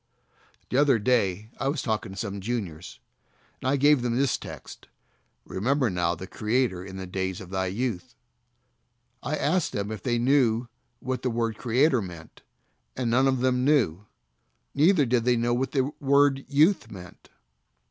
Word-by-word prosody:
The 125 - +1
other 140 -3 +4
day 110 -3 0
I 135 - -1
was 140 0 -1
talking 110 -3 -2
to - - -11
some 100 -1 -4
juniors, 90 - -5 0.6
and 130 - -1
I 140 - +3
gave 145 0 +4
them 120 -1 -1
this 135 -1 +2
text, - - -10 0.6
"Remember 125 +4 0
now 85 -1 0
thy 90 - -8
Creator 110 -2 -1
in 95 0 -9
the 95 - -5
days 95 0 -3
of 95 -1 -11
thy 95 0 -1
youth," 105 -1 -3 1.1
I - - -2
asked 170 +3 0
them 100 +1 -3
if 110 -3 -6
they 120 +2 0
knew 120 -2 +2 0.3
what 130 0 -3
the 130 - -1
word 115 -1 -1
"Creator" 125 +2 +2
meant, 85 -4 -10 0.6
and 125 -3 -1
none 130 +3 +4
of 130 -2 +1
them 125 -1 +1
knew, 110 - +2 0.7
neither 155 +1 +4
did 120 -1 +1
they 125 0 +3
know 120 +1 +1
what 130 +2 -1
the 135 -2 0
word 140 0 +3
"youth" 150 - +3
meant. 90 -4 -12
120 Hz, 170 wpm, -26 LUFS, 95-135 Hz, 1.1 s, other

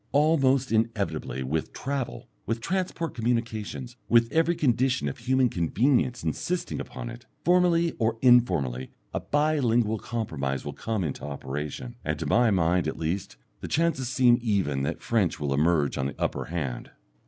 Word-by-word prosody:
Almost 140 -4 +3
inevitably 100 - -1
with 75 +5 -2
travel, 130 -3 -4 0.2
with 115 0 -1
transport 170 +1 -2
communications, 115 +1 -2
with 115 0 +4
every 165 +2 +2
condition 130 - +1
of 70 - -4
human 130 +2 +2
convenience 120 - +1
insisting 170 - -2
upon 125 -2 -6
it, 120 +2 -12 0.2
formally 175 -1 +4
or 115 0 +1
informally 85 - +3 0.2
a - - 0
bi 150 +1 +1
lingual 115 -3 +2
compromise 75 -14 -3
will 75 - -4
come 110 +4 -2
into 75 -5 -4
operation, 70 -2 -5
and - - -1
to - - -4
my 120 -1 +4
mind 90 -2 +2
at - - -3
least 85 -3 -3 0.2
the - - -6
chances 150 -6 0
seem 125 -3 +4
even 95 - 0
that 70 - -3
French 105 -7 +1
will 70 -2 -1
emerge 75 -1 +2
on 65 - 0
the 70 - -8
upper - - -1
hand. 70 -7 -4
115 Hz, 155 wpm, -27 LUFS, 80-130 Hz, 0.2 s, with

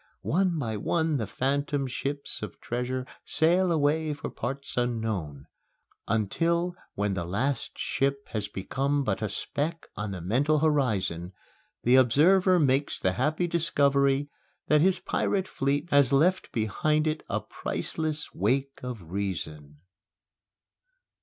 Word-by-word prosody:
One 180 0 +2
by 115 -7 -2
one 160 +7 0
the 110 -5 -2
phantom 140 +5 -1
ships 140 +2 -3
of 105 - -7
treasure 125 +2 -3 0.2
sail 175 +4 +4
away 155 0 +1
for 145 - -6
parts 140 +2 -5
unknown; 110 - -2 0.6
until, 170 - 0 0.2
when 100 0 0
the 90 -2 -2
last 115 +10 -2
ship 140 0 -1
has 105 -2 -2
become 140 +9 -1
but 105 -5 -1
a 110 - -1
speck 155 - -3
on 105 0 -3
the 95 -2 -5
mental 130 - +2
horizon, 110 - 0 0.5
the 125 +2 +5
observer 180 +9 +5
makes 140 -2 +2
the 95 - +1
happy 150 - 0
discovery 140 -4 +2 0.3
that 150 0 +4
his 185 +2 +4
pirate 190 +1 -1
fleet 140 +4 -1
has 140 -2 +5
left 170 +7 +2
behind 150 +8 +1
it 155 0 -1
a - - 0
priceless 155 -1 -4
wake 135 +1 0
of 125 -6 -6
Reason! 75 -7 -4
140 Hz, 130 wpm, -27 LUFS, 110-155 Hz, 0.6 s, the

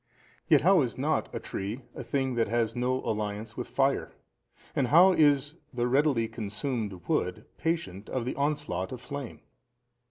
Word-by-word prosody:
Yet - - +6
how 185 +1 +5
is 125 -4 -2
not 150 +4 0
a - - -4
tree 105 +7 -5
a - - -6
thing 135 -2 -1
that 115 -1 +1
has 115 +1 0
no 125 +1 0
alliance 105 +1 -3
with 125 - -4
fire? 135 0 +1 0.6
and 135 - +2
how 175 +8 +7
is 145 -1 +3
the 120 -1 -1
readily 135 -3 +3
consumed 105 - -4
wood - - -1
patient 160 - -2
of 125 -3 -2
the 130 - -2
onslaught 140 -11 -1
of 130 - -5
flame? 140 -1 -7
130 Hz, 160 wpm, -29 LUFS, 110-145 Hz, 0.6 s, how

